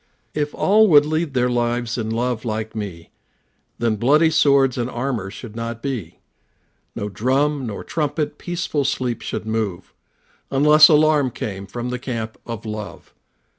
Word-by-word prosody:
If 150 -1 -2
all 215 +3 +4
would 150 -5 +6
lead 155 -2 -2
their 125 0 +3
lives 120 -1 -1
in 110 -2 -3
love 120 0 -1
like 110 -1 -4
me, 95 -6 -6 0.7
Then 115 -2 0
bloody 150 +8 +4
swords 140 -4 +4
and 120 0 -2
armor 120 -6 -3
should 110 +2 -10
not 115 0 -5
be; 120 - -4 0.8
No 105 - -3
drum 130 +6 0
nor 105 - -5
trumpet 150 -1 -2
peaceful 175 -4 -2
sleeps 130 -3 -2
should - - -4
move, 110 -5 -3 0.6
Unless 150 +3 +7
alarm 150 -3 +4
came 100 -4 -6
from 120 +5 -5
the 125 0 -3
camp 115 -3 -5
of 115 -1 -6
love. 105 -3 -7
125 Hz, 150 wpm, -21 LUFS, 110-145 Hz, 0.8 s, Unless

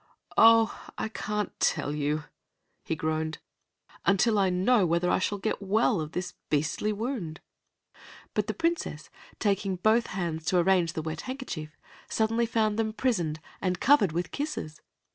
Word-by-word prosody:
"Oh, 225 0 +6 0.2
I 220 - -2
can't 210 -1 -3
tell 145 - +1
you," 150 +1 -1 0.6
he 160 - -2
groaned, 160 0 -2 0.7
"until 205 +2 +3
I 190 -1 +3
know 195 +5 +3
whether 170 +1 +2
I - - +3
shall 205 +2 -1
get 210 +2 -2
well 205 0 +2
of 155 +1 -6
this 180 -1 -3 0.2
beastly 155 +8 0
wound." 210 - -4 0.9
But - - 0
the - - -2
Princess, 330 - -2 0.3
taking 195 -2 0
both 220 +6 +3
hands 170 -4 -3
to 180 - +2
arrange 175 -2 +3
the 160 - -3
wet 160 0 -4
handkerchief, 220 - -6 0.3
suddenly 225 +1 +1
found 220 -2 +1
them 220 -1 0
prisoned 175 -12 0 0.2
and 180 -2 0
covered 240 - +5
with 170 +1 -2
kisses. 285 - -4
190 Hz, 150 wpm, -28 LUFS, 160-225 Hz, 0.9 s, Oh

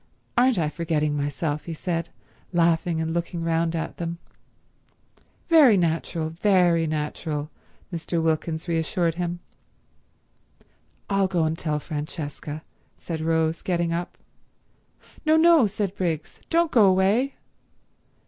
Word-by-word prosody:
"Aren't 250 -1 +4
I 160 -3 +1
forgetting 155 -2 -1
myself," 145 +1 -2
he 165 - -5
said, 170 0 -3 0.4
laughing 170 -1 +2
and 160 0 -1
looking 170 0 -3
round 165 0 0
at 160 - -4
them. 170 0 -4 1.3
"Very 295 - +7
natural, 165 -1 -1
very 175 -2 +3
natural," 150 0 -3 0.4
Mr. 170 0 -2
Wilkins 160 +1 -1
reassured 165 0 0
him. 175 +1 -3 1.7
"I'll 195 -1 +2
go 180 -3 +1
and 160 0 0
tell 155 -2 -2
Francesca," 150 0 -6 0.3
said 160 -2 -5
Rose, 160 0 +1
getting 170 -2 0
up. 175 +1 -4 1.1
"No, 315 0 +4
no," 325 -7 +6
said 200 -1 -2
Briggs. 165 -5 -3
"Don't 335 -1 +2
go 225 -4 +6
away." 195 +8 +2
170 Hz, 120 wpm, -25 LUFS, 160-185 Hz, 1.7 s, Very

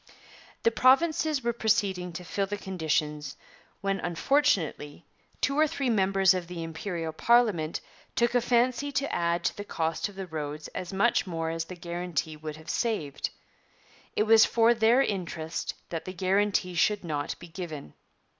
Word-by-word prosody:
'The 230 - +4
Provinces 280 +4 +3
were 235 0 +1
proceeding 200 -6 0
to 170 +2 -7
fulfil 195 +3 -2
the 205 +1 -3
conditions, 155 -6 -2 0.4
when, 195 -1 0
unfortunately, 175 - 0 0.4
two 280 +1 +1
or 310 - +5
three 270 -4 -1
members 195 -2 +4
of 180 -2 -3
the 170 -1 -5
Imperial 165 0 -4
parliament 205 -6 +3 0.4
took 235 0 +2
a 245 - +3
fancy 250 +4 +1
to 275 0 -1
add 170 0 0
to - - 0
the 205 - -5
cost 165 -1 -2
of 200 - -14
the 195 0 -5
roads 150 -2 -5
as 185 0 -6
much 200 +2 +2
more 165 -2 -2
as 165 0 -3
the 185 - -8
guarantee 170 -2 -3
would 155 0 -7
have 160 +1 -14
saved. 205 - -1 0.9
It - - +3
was 220 0 +7
for 230 0 +4
their 235 +3 +4
interest 170 -7 -3
that 165 -2 -4
the 185 - -5
guarantee 190 0 +1
should 200 +4 +2
not 150 -4 -3
be 175 - -11
given. 160 - -7
185 Hz, 165 wpm, -28 LUFS, 165-225 Hz, 0.9 s, was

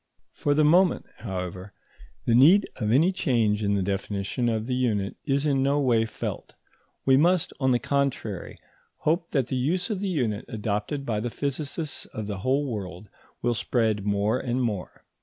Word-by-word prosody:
For 145 -1 0
the 155 0 +4
moment, 175 +3 +4
however, 95 -2 -5 0.5
the 115 - +2
need 160 - +6
of 110 -3 -1
any 160 +10 +4
change 115 - +1
in 100 -1 +1
the 100 - 0
definition 100 +4 -2
of 110 -1 -1
the 125 - -2
unit 110 -6 0
is 140 0 +1
in 140 -3 +2
no 140 +2 +2
way 115 -5 +2
felt; 110 - -6 0.5
we 130 0 +5
must, 175 +3 +3
on 130 -2 +2
the 125 - +4
contrary, 130 -8 -2 0.4
hope 165 +2 +1
that 135 -4 +1
the 130 - -3
use 175 - 0
of 205 - -2
the 200 0 -2
unit 120 - -1
adopted 110 +6 -3
by 110 -4 -1
the 120 +3 -2
physicists 145 +3 -4
of 110 - -6
the 100 -2 -4
whole 135 +7 +1
world 100 -5 -6 0.3
will 120 0 +2
spread 110 -3 0
more 105 +4 +1
and 125 0 -1
more. 105 -7 -4
120 Hz, 175 wpm, -26 LUFS, 105-145 Hz, 0.5 s, need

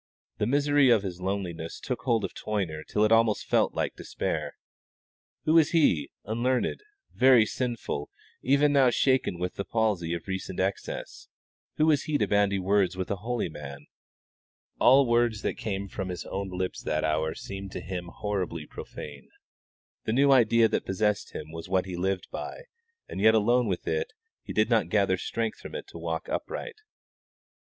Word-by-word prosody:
The 105 - +1
misery 145 +1 +4
of 115 -4 +4
his 90 -2 -5
loneliness 90 -4 -3
took 125 -3 -4
hold 115 -4 +1
of - - -6
Toyner 90 -8 -3
till 105 +6 0
it 110 - +3
almost 115 -1 +3
felt - - +2
like - - -1
despair. - - -3 0.9
Who 155 - +3
was 165 -1 +5
he, 90 - +3 0.2
unlearned, 120 - 0 0.3
very 125 -3 +6
sinful, 115 - -3 0.3
even 140 +3 +3
now 135 -3 +5
shaken 130 -6 +2
with 90 +1 -4
the 100 - -1
palsy 100 -7 0
of 85 - -8
recent 95 -1 -4
excess 95 +1 -3 0.5
who 155 - +4
was 150 -3 +3
he 150 -1 +1
to 105 - +2
bandy 100 0 +2
words 95 0 +1
with 95 +1 -3
a 100 - -1
holy 115 +2 -2
man? 70 -3 -9 0.9
All 135 +2 +6
words 120 -2 +2
that - - 0
came 100 -2 -3
from 95 -1 -5
his 90 -2 -5
own 95 0 -4
lips 90 0 -3
that 75 - -1
hour 80 0 0
seemed 100 0 -7
to - - -4
him 90 -1 -5
horribly 90 -5 -3
profane. 70 -2 -9 0.8
The 110 - 0
new 140 +3 +4
idea 115 -3 +5
that - - -1
possessed 105 +2 -1
him 75 0 -7
was 80 +2 -8
what 95 -1 +2
he 95 -2 -5
lived 95 +1 -1
by, - - -6 0.4
and - - -5
yet 110 +1 +6
alone 120 +3 +3
with 95 -3 -3
it 465 +1 -1 0.3
he - - -8
did - - +2
not - - +2
gather - - +2
strength 445 0 -3
from - - -9
it - - -5
to - - -9
walk - - -3
upright. 465 -2 -4
105 Hz, 175 wpm, -27 LUFS, 90-120 Hz, 0.9 s, very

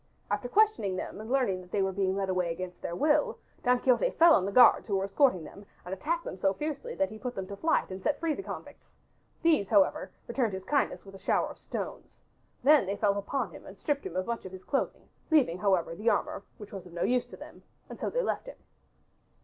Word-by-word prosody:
After 245 - -1
questioning 415 - +3
them 190 - -5
and 220 - -9
learning 245 -9 +1
that 180 - -15
they 200 - +1
were 190 - 0
being 190 0 0
led 195 -1 -1
away 180 -2 0
against 180 +1 -6
their 170 - -4
will 295 - +2 0.3
Don 250 0 +3
Quixote 260 - +3
fell 335 0 +8
on 185 - +3
the - - -2
guards 245 +3 +6
who 200 - 0
were 190 - +1
escorting 195 - +2
them 200 +6 -11 0.2
and 180 - -5
attacked 335 - -2
them 185 - -6
so 195 +1 +2
fiercely 300 +5 -4
that 190 - +1
he 215 - -9
put 250 +1 -5
them 195 - -4
to 200 - -7
flight 315 -3 +1
and 185 +1 -6
set 290 - 0
free 330 -1 0
the 390 - -5
convicts. - - -9 0.6
These, 315 - +3
however, 200 -4 +3 0.2
returned 235 -3 -1
his 190 0 -5
kindness 285 +7 0
by 195 - -12
a 195 - -12
shower - - +1
of - - -11
stones. - - -6 0.5
They 295 0 +6
then 200 +1 -3
fell 200 -1 +2
upon 210 +4 -2
him - - -12
and 195 - -11
stripped 290 -2 -1
him 175 - -6
of 185 0 0
much 235 0 -3
of 185 - -8
his 185 0 -9
clothing, 275 - -2 0.2
leaving, 260 - +3
however, 185 -4 +1
the 210 +7 0
armor - - 0 0.2
which 210 -1 -11
was 190 -2 -7
of 175 - -15
no 175 0 -2
use 245 0 +1
to - - -11
them, - - -12 0.3
and - - -10
so - - -1
they - - 0
left - - -2
him. - - -9
205 Hz, 245 wpm, -29 LUFS, 190-275 Hz, 0.6 s, fell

